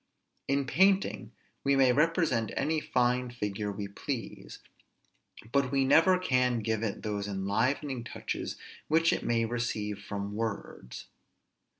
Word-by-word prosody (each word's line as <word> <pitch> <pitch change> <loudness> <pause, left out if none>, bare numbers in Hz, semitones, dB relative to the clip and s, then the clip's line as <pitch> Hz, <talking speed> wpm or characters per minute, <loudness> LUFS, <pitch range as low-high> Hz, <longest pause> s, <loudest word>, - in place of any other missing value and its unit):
In 140 0 +1
painting 190 +8 +2 0.3
we 140 0 +3
may 135 -2 +5
represent 150 - +2
any 155 +1 +1
fine 125 -2 +1
figure 105 -3 -3
we 100 0 -5
please; 100 - -6 0.9
but 140 -2 +2
we 135 -1 +2
never 165 +7 +5
can 125 -9 +1
give 110 0 -1
it 110 -3 -3
those 105 -1 -2
enlivening 115 +7 -1
touches 120 - -5 0.3
which 165 +2 +3
it - - -1
may 115 -1 +1
receive 110 -3 -2
from 100 0 -5
words. 105 - -5
120 Hz, 125 wpm, -30 LUFS, 105-140 Hz, 0.9 s, may